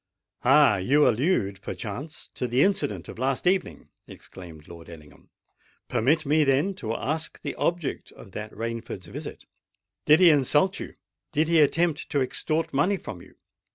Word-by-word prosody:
"Ah! 105 - +5
you 140 +11 +3
allude, 110 - 0
perchance, 125 +10 -7
to 125 - -4
the 125 +3 +3
incident 105 - 0
of - - -10
last 130 +3 -1
evening!" 185 +1 0 0.2
exclaimed 80 -5 -12
Lord 85 -1 -12
Ellingham. 75 -3 -15 0.6
"Permit 155 +7 +1
me, 150 +2 +3
then, 140 +7 +2
to 115 -5 -4
ask 155 +3 -3
the - - -3
object 170 -4 -2
of 100 - -14
that 105 +3 -7
Rainford's 115 -4 -6
visit? - - -8 0.6
Did 155 +2 +6
he 180 -3 +7
insult 150 +6 +2
you? - - -8 0.4
did 155 +1 +1
he 165 -1 +4
attempt 155 +1 +1
to 145 - 0
extort 155 +4 -1
money 180 +9 +2
from 105 - -9
you? 95 - -17
135 Hz, 155 wpm, -25 LUFS, 105-160 Hz, 0.6 s, he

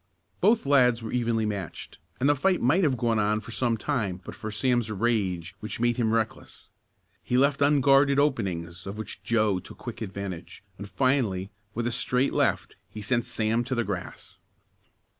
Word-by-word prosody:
Both 225 -4 +3
lads 125 -4 +4
were 110 - -5
evenly 115 -2 0
matched 100 -5 -5 0.2
and 135 - +2
the 145 - +4
fight 185 +6 +2
might 155 +11 +3
have 135 -5 +2
gone 115 -1 +1
on 105 +1 +1
for 110 +2 -10
some 115 0 0
time 105 -7 -2
but - - -7
for 110 - -6
Sam's 120 +1 0
rage 95 -5 -1
which 110 +2 -6
made 120 +1 +1
him 115 -3 +1
reckless. 115 -1 -3 0.5
He 125 - 0
left 140 +2 +3
unguarded 140 -1 +4
openings 95 - -1
of 100 +2 -6
which 110 - -7
Joe 110 -5 +1
took 90 - -12
quick 120 -2 -8
advantage, 100 -4 -6 0.2
and 100 - -7
finally, 100 -4 0 0.2
with 120 +1 -1
a 120 - 0
straight 125 +3 +1
left, - - 0
he 105 - -8
sent 120 +2 +1
Sam 115 -1 0
to 130 +1 -2
the 120 - +1
grass. 90 -5 -6
115 Hz, 180 wpm, -27 LUFS, 105-130 Hz, 0.5 s, lads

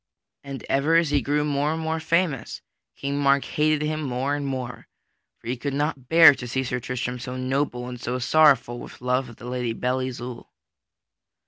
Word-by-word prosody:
And 140 -1 -7
ever 145 +4 +2
as 165 -3 +3
he 145 -1 +3
grew 150 +1 0
more 145 0 0
and 160 - -3
more 160 0 -2
famous, 160 -6 -1 0.3
King 140 +1 -3
Mark 140 -1 +3
hated 150 0 +1
him 155 0 -2
more 135 0 -1
and 145 -1 -2
more. 130 -2 -5 0.5
For - - -24
he 125 - -1
could 135 +3 -4
not 145 -3 -2
bear 165 -2 +9
to 125 -2 -7
see 130 +2 -1
Sir 125 -1 -2
Tristram 125 0 -4
so 125 +1 -6
noble 130 -1 -1
and 125 -1 -7
so 125 +1 -2
sorrowful 130 -2 +4
with - - -11
love 125 0 0
of 120 - -12
the 120 - -12
Lady 125 -2 -2
Belle 125 +3 -1
Isoult. 125 -1 -6
135 Hz, 195 wpm, -24 LUFS, 125-150 Hz, 0.5 s, bear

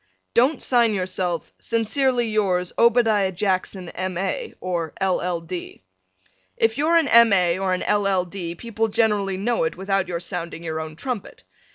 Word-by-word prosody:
Don't 260 +7 +3
sign 235 -4 +3
yourself, 185 -2 -3
Sincerely 240 +2 +1
yours, 190 -5 0
Obadiah 225 -5 +3
Jackson, 185 -1 -2
M.A. 185 - -3
or 170 -4 -3
L.L. 180 -2 0
D. 170 - -7 0.7
If 225 +3 +1
you're 320 +3 +3
an 325 -3 +3
M. 235 -2 +6
A. 180 -2 +3
or 190 -1 +1
an - - -4
L.L. 195 -3 +1
D. 175 -2 -6
people 225 +2 -2
generally 205 -3 +1
know 230 +2 0
it 160 - -2
without 195 0 0
your 175 -1 -3
sounding 170 -1 -5
your 160 -1 -3
own 155 0 -6
trumpet. 245 - -6
195 Hz, 155 wpm, -23 LUFS, 180-225 Hz, 0.7 s, M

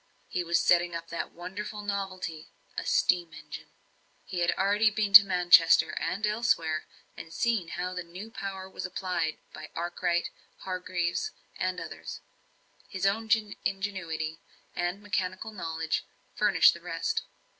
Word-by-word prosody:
He 180 - -1
was 170 0 +2
setting 175 -1 +3
up 165 0 -6
that 170 - -4
wonderful 205 +4 -6
novelty 185 -5 -4 0.3
a - - -4
steam 180 - +2
engine. - - -9 0.6
He 180 - -4
had 175 0 +2
already 205 +3 +4
been 210 -1 -1
to 205 0 +13
Manchester 180 -3 +6
and 185 +6 -1
elsewhere, 210 -8 0 0.3
and 165 - -9
seen 225 -3 0
how 180 +2 -3
the 180 - -3
new 180 +6 -9
power 195 -3 -5
was 190 - -7
applied 180 -3 -2 0.2
by 155 - -9
Arkwright, 175 0 -1 0.3
Hargreaves, 180 - -2 0.3
and - - -1
others; - - -7 0.7
his 190 -1 -3
own 220 +3 +1 0.3
ingenuity 170 -5 -3 0.4
and 175 +3 -2
mechanical 190 +1 -2
knowledge 165 -5 -2 0.3
furnished - - +5
the - - -10
rest. 445 0 -1
185 Hz, 135 wpm, -29 LUFS, 170-200 Hz, 0.7 s, to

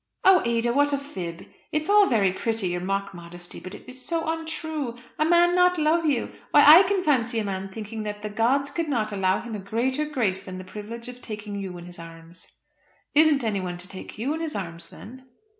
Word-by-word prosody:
"Oh, 375 -2 +7
Ada, 235 0 +1
what 285 +2 +3
a - - +2
fib. 185 - -6 0.3
It 305 0 0
is - - -9
all 410 -1 +6
very 200 -6 +2
pretty, 220 -2 -1
your 175 0 -2
mock 195 +2 -2
modestly, 175 0 -8
but 185 +2 -9
it - - -14
is 255 0 -10
so 330 -2 -2
untrue. 315 -5 -3 0.2
A 305 - +3
man 345 +1 +4
not 360 0 +4
love 320 +1 +2
you! 270 -6 0 0.2
Why, 290 - +6
I 310 +5 +11
can 385 -1 +1
fancy 245 -6 +1
a 220 - +1
man 195 -1 -4
thinking 220 +2 -6
that 210 0 -5
the 210 - -3
gods 260 +6 +1
could 335 -2 -2
not 220 -6 0
allow 190 -1 +1
him 235 -1 -7
a 210 - -4
greater 245 +9 -1
grace 230 -11 -1
than 185 -1 -7
the 185 - -7
privilege 215 +5 -8
of 250 0 -9
taking 210 -2 -7
you 190 -3 -5
in 175 - -10
his 175 -1 -11
arms." 165 +1 -13 0.7
"Isn't 300 -2 +5
anyone 190 -5 -2
to 175 +1 -8
take 190 +2 -9
you 255 +7 -1
in 320 - -4
his 320 -2 -3
arms, 170 -3 -6
then?" 260 +4 -12
230 Hz, 225 wpm, -25 LUFS, 190-300 Hz, 0.7 s, I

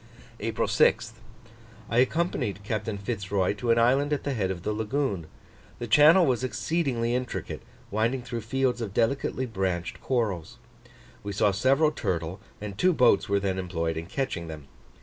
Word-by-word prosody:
April - - -1
6th. 110 - +3 0.8
I 115 - +1
accompanied 130 - 0
Captain 110 0 -3
Fitz 100 -2 -5
Roy 95 -1 +2
to 110 +4 -4
an 115 - +5
island 135 +5 +3
at 145 - 0
the 140 - -1
head 100 -6 -1
of 90 -2 -4
the 105 - -1
lagoon: 110 - -2 0.5
the 120 - -4
channel 155 - +6
was 130 -3 +1
exceedingly 130 -3 -1
intricate, 125 0 -3 0.3
winding 115 +5 0
through 120 -1 -4
fields 125 +1 0
of 100 -4 -5
delicately 130 +2 0
branched 95 -6 -3
corals. 105 -11 -2 0.6
We 100 0 -5
saw 100 +1 +3
several 135 +9 +3
turtle 85 - -3 0.2
and 105 -2 -6
two 185 0 +4
boats 125 -10 +4
were 100 0 +3
then 95 -1 -1
employed 85 -3 -2
in 80 +1 -5
catching 95 -9 -3
them. 75 -3 -9
115 Hz, 165 wpm, -27 LUFS, 95-130 Hz, 0.8 s, channel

